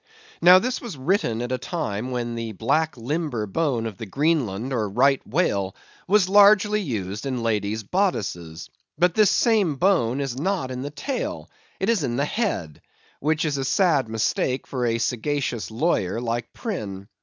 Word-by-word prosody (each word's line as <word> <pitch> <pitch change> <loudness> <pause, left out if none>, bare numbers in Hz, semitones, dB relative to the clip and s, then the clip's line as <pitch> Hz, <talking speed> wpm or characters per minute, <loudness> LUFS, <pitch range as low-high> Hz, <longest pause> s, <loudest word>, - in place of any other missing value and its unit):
Now 180 +1 +9
this 250 +6 -1
was 225 - -7
written 130 - 0
at 120 - -4
a 130 - -1
time 125 - -3
when 120 -2 -3
the 115 -1 -4
black 155 - 0
limber 130 -2 -2
bone 120 +1 -1
of 110 -4 -5
the 110 - -6
Greenland 135 - 0
or 110 -4 -1
Right 135 +6 +3
whale 100 - 0 0.3
was 195 -1 +4
largely 205 +1 +5
used 105 - -4
in 125 -3 -2
ladies' 110 -1 -1
bodices. 100 - -2 0.3
But 180 -1 +3
this 210 -1 +5
same 210 - +2
bone 135 -7 +2
is 135 -2 -3
not 165 -5 -1
in 125 0 -4
the 140 - -4
tail; 255 - -4 0.3
it 190 - -1
is 225 -8 +2
in 120 -3 -1
the 140 +3 +1
head, 150 - -2 0.4
which 155 +2 0
is 145 -3 -1
a - - -1
sad 140 - +2
mistake 110 +3 -1
for 125 -3 -2
a 115 0 +1
sagacious 125 - -2
lawyer 110 - 0
like 120 0 -3
Prynne. 100 - -5
130 Hz, 170 wpm, -24 LUFS, 115-175 Hz, 0.4 s, Now